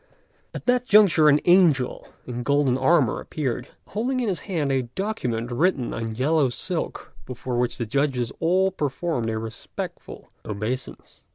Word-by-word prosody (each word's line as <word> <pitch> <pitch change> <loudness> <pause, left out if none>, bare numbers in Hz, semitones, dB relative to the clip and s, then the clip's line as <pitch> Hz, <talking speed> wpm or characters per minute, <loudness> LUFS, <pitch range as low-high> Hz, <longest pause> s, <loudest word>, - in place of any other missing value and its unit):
At - - -6
that 250 0 +2
juncture 185 -7 +6
an 145 0 +5
angel 170 -8 +3 0.2
in 125 -1 -5
golden 140 0 +2
armour 135 -1 +3
appeared, 135 -7 -3 0.2
holding 250 +5 -1
in 240 -4 0
his 180 -5 -1
hand 155 -7 0
a 135 -1 +2
document 125 - -2
written 140 -1 +1
on 115 -1 -4
yellow 140 +2 +2
silk, 170 +7 -3
before 125 -1 -3
which 120 -1 0
the 120 - -2
judges 130 0 0
all 185 +3 +2
performed 145 -6 -2
a 110 - -2
respectful 110 0 -7
obeisance. 110 +5 -5
140 Hz, 150 wpm, -24 LUFS, 120-175 Hz, 0.2 s, juncture